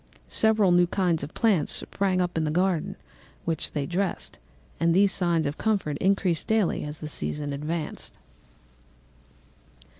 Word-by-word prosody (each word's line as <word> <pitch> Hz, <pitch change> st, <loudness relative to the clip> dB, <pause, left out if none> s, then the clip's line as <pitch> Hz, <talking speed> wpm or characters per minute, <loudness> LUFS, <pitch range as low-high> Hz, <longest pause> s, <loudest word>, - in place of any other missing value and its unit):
Several 220 Hz, -4 st, +3 dB
new 175 Hz, 0 st, +5 dB
kinds 175 Hz, -3 st, 0 dB
of 140 Hz, -, -7 dB
plants 210 Hz, -9 st, +2 dB
sprang 190 Hz, -2 st, 0 dB
up 180 Hz, -1 st, -2 dB
in 160 Hz, -, +1 dB
the 155 Hz, -, 0 dB
garden, 180 Hz, +2 st, 0 dB, 0.5 s
which 165 Hz, -1 st, -2 dB
they 145 Hz, -2 st, -1 dB
dressed; 180 Hz, +2 st, -3 dB, 0.4 s
and 165 Hz, 0 st, +3 dB
these 195 Hz, +1 st, +5 dB
signs 170 Hz, -4 st, +1 dB
of 145 Hz, +2 st, -3 dB
comfort 200 Hz, -9 st, 0 dB
increased 190 Hz, -4 st, +1 dB
daily 220 Hz, -5 st, +1 dB
as 150 Hz, +1 st, -6 dB
the 155 Hz, -, -4 dB
season 145 Hz, -1 st, -2 dB
advanced. 155 Hz, +3 st, -5 dB
175 Hz, 145 wpm, -26 LUFS, 155-195 Hz, 0.5 s, new